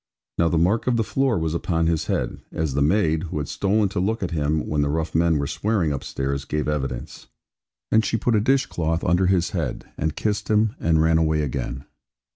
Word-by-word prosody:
Now 85 - +4
the 85 - +1
mark 95 +10 +2
of 125 -2 +2
the 115 - +2
floor 135 +2 +1
was 80 -1 -1
upon 85 -1 0
his 80 -1 0
head, - - -2
as 80 -4 -2
the 70 - 0
maid 80 0 +2
(who 80 - -5
had 75 -2 -2
stolen 100 +1 +1
to 95 - -3
look 105 +4 0
at 90 - -2
him, 75 -1 0
when 75 -1 0
the 70 - +1
rough 80 +2 -2
men 80 -1 +3
were 70 - -1
swearing 95 +1 0
upstairs) 70 0 -3
gave 75 +2 -2
evidence. 70 -5 -4 0.6
And 110 0 +4
she 115 - 0
put 120 +2 0
a 105 - +3
dish 135 +3 +2
cloth 80 0 -2
under 90 +1 +2
his 90 -2 +2
head, 80 -9 -3
and 80 -2 -1
kissed 105 -2 -1
him, 110 0 +3
and 80 -1 +2
ran 80 0 +3
away 80 -1 +1
again. 65 -1 -4
80 Hz, 220 wpm, -23 LUFS, 75-100 Hz, 0.6 s, Now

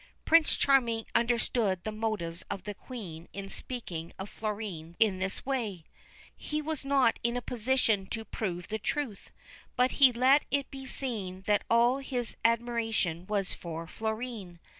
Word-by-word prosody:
Prince 330 -1 +5
Charming 235 -5 +3
understood 230 -5 +1
the 215 - -2
motives 210 -6 -2
of 195 - -4
the 205 - -4
Queen 190 -8 -8
in 195 0 -6
speaking 175 -10 -5
of 190 +1 -6
Florine 200 -7 -4
in 205 -4 +4
this 190 0 -2
way. 225 -10 -2 0.5
He 300 - -2
was 305 -1 -2
not 275 -4 +3
in 235 +1 0
a - - -2
position 230 -4 +1
to 225 +2 -4
prove 180 -7 -4
the 220 +1 -2
truth, 250 -2 -3 0.5
but 250 +1 +3
he 265 -2 +10
let 260 +4 +5
it 280 -1 0
be 270 -1 -7
seen 200 -10 -3
that 205 -1 +3
all 240 +3 +4
his 250 -4 -2
admiration 225 -7 +1
was 200 -3 0
for 165 -1 -5
Florine. 220 -2 -4
225 Hz, 155 wpm, -30 LUFS, 190-250 Hz, 0.5 s, he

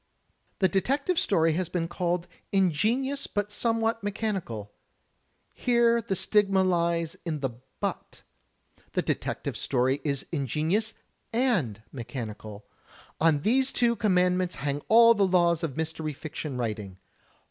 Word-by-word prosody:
The 190 - +4
detective 275 - +1
story 165 -4 +2
has 180 +1 -1
been 170 -2 -1
called 175 0 -1 0.3
"ingenious 215 - +1
but 205 0 -2
some 230 +1 +1
what 225 0 0
mechanical." 195 - -3 0.8
Here 235 -1 +3
the 225 -3 -2
stigma 195 0 +3
lies 170 -2 +1
in 155 -4 -3
the"6w/." 130 0 -5 0.7
The - - +1
detective - - -2
story 130 +3 0
is 140 -3 -1
ingenious 160 - -1 0.4
and 195 - +1
mechanical. 110 -5 -7 0.5
On 155 -2 +3
these 260 - +2
two 235 -1 +2
commandments 180 -3 +2
hang 145 0 -2
all 230 +1 +7
the 200 -3 +2
laws 175 -3 +3
of 155 -4 -3
mystery 160 -1 -3
fiction 150 -2 -6
writing. 105 -5 -4
175 Hz, 125 wpm, -27 LUFS, 145-215 Hz, 0.8 s, all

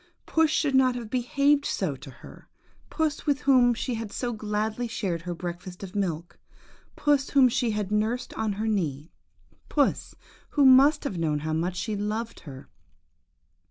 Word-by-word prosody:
Puss 320 -1 +2
should 295 -1 +1
not 260 -1 +4
have 235 -3 -7
behaved 280 +3 +2
so 185 - -2
to 135 - -12
her; 120 -2 -14 0.4
puss, 315 -1 -2
with 290 0 +1
whom 250 -3 +4
she 250 +2 -3
had 225 -2 -5
so 240 0 -3
gladly 215 +2 -2
shared 190 -7 -3
her 175 0 -5
breakfast 180 +2 -7
of 190 -1 -8
milk; 175 -4 -3 0.6
puss, 290 -2 +1
whom 270 -2 +5
she 240 0 0
had 210 -2 -2
nursed 220 +4 -1
on 220 -2 -2
her 215 +3 -3
knee; 160 -8 -2 0.6
puss, 285 -3 0 0.4
who 285 - +6
must 275 +3 +6
have 195 - -3
known 150 -3 0
how 155 +1 -2
much 170 +3 -1
she 190 +4 -3
loved 215 +3 -3
her! 135 -4 -11
220 Hz, 165 wpm, -26 LUFS, 180-260 Hz, 0.6 s, who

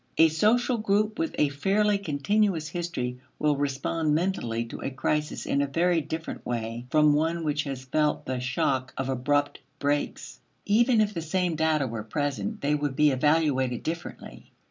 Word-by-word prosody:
A 160 0 +7
social 230 +9 +2
group 215 0 +1
with 325 -1 -1
a 150 - +3
fairly 200 +8 +1
continuous 170 +1 0
history 125 -8 -3 0.2
will 150 -1 +2
respond 145 +3 0
mentally 120 -10 -1
to 115 - -8
a - - -2
crisis 150 +3 -2
in 140 - +1
a 140 - 0
very 170 +3 +2
different 160 +2 -6
way 115 0 -4
from 150 0 +4
one 165 +3 0
which 150 -1 -1
has 135 -2 -5
felt 150 +2 0
the 130 -1 -2
shock 130 +1 -1
of 135 0 -2
abrupt 145 +3 0 0.2
breaks. 145 +1 -2 0.3
Even 230 +2 +4
if 210 -1 0
the 170 - -3
same 180 +2 0
data 155 -2 +2
were 115 -3 -4
present, 120 -2 -3
they 145 +1 +1
would 145 -2 -1
be 150 +1 +4
evaluated 130 -3 +1
differently. 165 +2 -7
150 Hz, 165 wpm, -27 LUFS, 135-170 Hz, 0.3 s, A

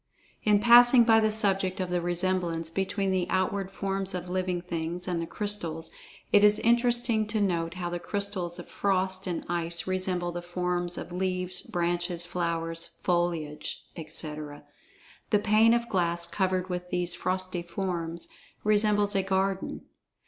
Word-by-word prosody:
In 210 -1 +4
passing 240 +2 +7
by 225 -1 +5
the 220 0 +2
subject 195 -3 +2
of 185 -1 -2
the 175 -1 0
resemblance 175 -2 0
between 195 +2 -1
the 185 -2 0
outward 190 +1 0
forms 195 -1 -3
of 180 0 -5
living 185 -1 -1
things 175 0 -4
and 175 -2 -1
the 165 - -4
crystals, 175 -7 -2 0.4
it 205 - +6
is 210 0 +6
interesting 235 -1 +2
to 215 0 -1
note 170 -4 0
how 175 -1 -4
the 175 - -3
crystals 185 -1 -3
of 175 - -9
frost 190 -1 0
and 175 -2 -3
ice 170 0 -1
resemble 185 -2 -1
the 175 0 -5
forms 175 0 -2
of - - -7
leaves, 180 0 -1
branches, 175 0 -1
flowers, 165 -1 -3
foliage, 170 -4 -1
etc.—the 155 +5 -6
pane 215 +2 +4
of 235 0 -1
glass 170 -4 +1
covered 185 -1 -1
with 180 -1 -5
these 180 -1 +1
frosty 185 -1 -2
forms, 170 -2 -4 0.4
resembles 210 -1 +3
a 195 - +3
garden. 190 0 -1
185 Hz, 150 wpm, -28 LUFS, 175-200 Hz, 0.4 s, passing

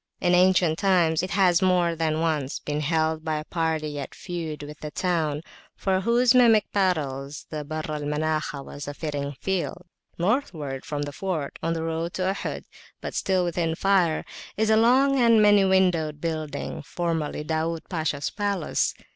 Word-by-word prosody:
In 180 -1 +2
ancient 180 -3 +4
times 175 -5 +3
it 185 - -3
has 185 -2 +3
more 180 -2 +3
than 160 -1 0
once 150 -4 -1
been 150 0 -3
held 160 +1 0
by 160 -1 -1
a 150 - -4
party 160 -3 -2
at 140 - -7
feud 165 -5 -5
with 150 +1 -9
the 150 - -5
town, 160 -3 -1 0.3
for 190 -1 0
whose 235 +3 +4
mimic 230 -4 +5
battles 150 -7 -1
the 155 -1 -4
Barr 155 +2 -4
al 150 -1 -3
Manakhah 150 -1 -2
was 145 0 -8
a 145 - -5
fitting 145 -3 -4
field. 185 -1 -2 0.3
Northward 170 - -1
from 145 -1 -3
the 145 - -5
fort, 160 -3 -4
on 165 - 0
the 165 -1 -3
road 165 +1 -3
to 185 - -1
Ohod, - - -5 0.4
but - - -6
still 190 -2 +1
within 165 -1 -1
fire, 180 -4 +2 0.3
is 220 +1 +2
a - - +6
long 260 +5 +4 0.2
many 205 -1 +6
windowed 180 -6 +2
building, 155 -3 -4
formerly 160 -1 -2
Da'ud 160 +1 -1
Pasha's 155 -5 -2
palace. 200 -5 -1
165 Hz, 165 wpm, -25 LUFS, 150-185 Hz, 0.4 s, a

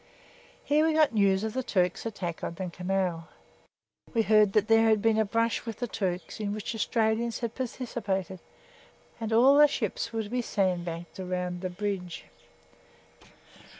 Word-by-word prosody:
Here 300 +1 +3
we 320 0 +2
got 310 -5 +3
news 200 -2 +3
of 220 -1 -3
the 260 - -1
Turks' 180 -3 0
attack 180 -6 -5
on 170 - -4
the 180 0 -5
Canal. 180 -2 -2 0.9
We 225 - +3
heard 215 -2 +4
that 210 0 +3
there 225 0 +5
had 215 -1 +4
been 220 +1 +2
a 220 - +3
brush 230 +2 0
with 225 -2 -6
the 245 - -2
Turks, 190 -5 -4
in 205 -1 -2
which 215 +2 -4
Australians 225 +1 0
had 235 -2 -3
participated, 210 -7 -3 0.8
and 225 -1 -4
all 250 +5 +6
the 295 - +9
ships 230 -3 -3
were 225 -1 -2
to 205 - -9
be 250 +2 -1
sandbagged 175 -5 -2
round 180 -1 -3
the 185 - -2
bridge. 180 -2 -4
210 Hz, 165 wpm, -28 LUFS, 185-230 Hz, 0.9 s, the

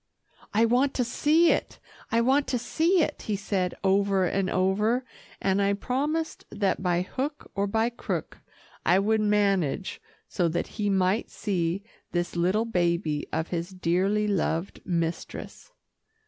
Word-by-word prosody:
"I 220 +3 +4
want 255 +4 +2
to 250 - +2
see 305 +7 +3
it - - -1 0.3
I 230 - +3
want 270 +4 +3
to 250 - 0
see 330 +8 +2
it," 295 - -3
he 210 - -2
said 195 -3 -1
over 195 -1 +3
and 190 +1 0
over, 210 +7 +1 0.3
and 195 +1 +1
I 200 0 +2
promised 290 +10 -2
that 195 -3 0
by 180 -1 +1
hook 280 +9 -5
or 200 +1 0
by 225 +3 +1
crook, 235 - -4 0.4
I 180 - +4
would 215 +2 +2
manage 200 -5 +1 0.3
so 175 - 0
that 170 +1 -1 0.2
he 205 - +1
might 190 +3 +1
see 185 -2 -2 0.3
this 175 0 -1
little 185 +6 +2
baby 170 -7 0
of 160 +2 -2
his 170 0 -3
dearly 190 +3 +1
loved 180 -2 -1
mistress. 170 - -4
200 Hz, 150 wpm, -27 LUFS, 180-230 Hz, 0.4 s, I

